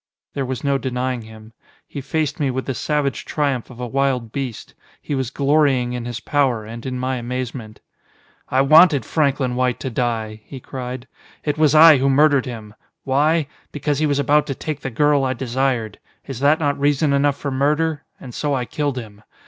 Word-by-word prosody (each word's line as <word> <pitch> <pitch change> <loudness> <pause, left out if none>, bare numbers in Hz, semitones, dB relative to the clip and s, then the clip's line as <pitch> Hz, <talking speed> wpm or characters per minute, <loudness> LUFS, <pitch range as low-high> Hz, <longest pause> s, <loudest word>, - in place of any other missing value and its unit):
There 135 -2 -3
was 130 -2 -4
no 140 -1 +1
denying 125 0 -2
him. 110 0 -13 0.3
He 140 - -6
faced 150 +1 -2
me 140 -3 +1
with 130 +1 -3
the 135 - -2
savage 145 +2 -1
triumph 140 -5 -2
of 125 -1 -13
a 125 - -3
wild 130 -2 -1
beast. 130 -4 -5 0.3
He - - -5
was 130 -4 -1
glorying 135 -3 +2
in 120 -1 -4
his 120 -1 -5
power, 130 -5 0
and 115 +3 -8
in 130 -1 -3
my 130 +1 -2
amazement. 120 -2 -5 0.7
"I 130 - +3
wanted 150 -2 +6
Franklin 140 -5 0
White 125 -1 0
to 130 - -4
die!" 110 -3 -2
he 135 - -10
cried. 125 0 -7 0.4
"It 150 0 -2
was 155 -1 +4
I 155 -1 +9
who 135 +1 +2
murdered 140 -1 +4
him. 110 -4 -8 0.3
Why? 150 +4 +2 0.3
Because 145 -1 -2
he 155 - +2
was 145 -1 +1
about 145 +1 +2
to 135 - -3
take 150 +1 -5
the 135 - -4
girl 145 +3 +2
I 130 -1 0
desired. 125 -3 -2 0.3
Is 135 -4 -6
that 145 +3 +4
not 145 -3 0
reason 145 +1 +2
enough 140 0 +2
for 140 - -4
murder? 150 +3 0 0.2
And 125 -3 -10
so 145 +2 -1
I 125 -2 -2
killed 145 0 -2
him. 105 -4 -8
135 Hz, 195 wpm, -20 LUFS, 125-145 Hz, 0.7 s, I